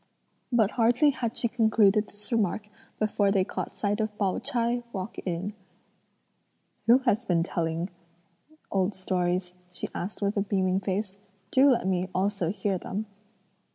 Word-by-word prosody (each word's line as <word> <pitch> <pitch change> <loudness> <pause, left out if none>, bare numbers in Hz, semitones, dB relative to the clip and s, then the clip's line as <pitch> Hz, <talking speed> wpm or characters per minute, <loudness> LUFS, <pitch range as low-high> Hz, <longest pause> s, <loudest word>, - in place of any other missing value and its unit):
But 220 -4 +3
hardly 245 +5 +4
had 235 -4 -3
she 235 - +1
concluded 220 -3 +3
this 205 +2 -12
remark 210 -2 0 0.3
before 210 -1 +2
they 195 -1 +3
caught - - -5
sight 205 +1 0
of 215 -1 -2
Pao 195 -3 +1
ch'ai 240 0 0
walk 190 0 -5
in. 180 +4 -2 1.3
"Who 235 +2 +8
has 235 -1 +2
been 175 -7 +2
telling 170 +1 -2 0.8
old 195 +1 +1
stories?" 180 -1 -1 0.2
she 180 - -5
asked 195 +4 -4
with 200 +1 0
a - - +3
beaming 190 -2 +1
face; 195 +1 -3 0.3
"do 270 +2 +6
let 240 -5 +2
me 185 0 0
also 190 -2 +1
hear 190 0 -1
them." 205 +5 -4
200 Hz, 150 wpm, -28 LUFS, 185-220 Hz, 1.3 s, Who